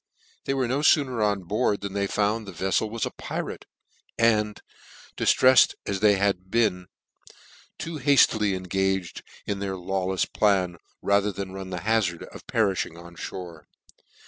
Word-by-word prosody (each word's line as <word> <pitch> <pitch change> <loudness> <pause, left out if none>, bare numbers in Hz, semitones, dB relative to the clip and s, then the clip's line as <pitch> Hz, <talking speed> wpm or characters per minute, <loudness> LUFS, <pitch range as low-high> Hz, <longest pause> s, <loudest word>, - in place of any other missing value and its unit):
They 135 - 0
were 130 -2 0
no 130 +4 0
fooner 135 -6 +3
on 100 -2 0
board 100 +2 0
than 100 -1 -5
they 100 0 0
found 105 +2 0
the - - -6
vefiel 95 +4 0
was 115 0 -2
a - - -4
pirate, - - -6 0.5
and, 105 -2 +2 0.6
diftreffed 130 0 +5
as 100 -1 -2
they 105 0 +5
had 95 -2 0
been, 100 -6 +1 0.9
too 160 -2 -5
haftily 115 -7 +4
engaged 95 0 -2 0.2
in 100 -1 -3
their 100 -1 -3
lawlefs 95 +1 -1
plan, 95 -4 +1 0.3
rather 100 +1 +2
than 95 -1 -6
run 95 -1 -7
the 90 -2 -5
hazard 105 -5 0
of - - -12
periming 95 -6 0
on 85 0 -12 0.2
more. 85 -4 -9
100 Hz, 150 wpm, -25 LUFS, 95-110 Hz, 0.9 s, diftreffed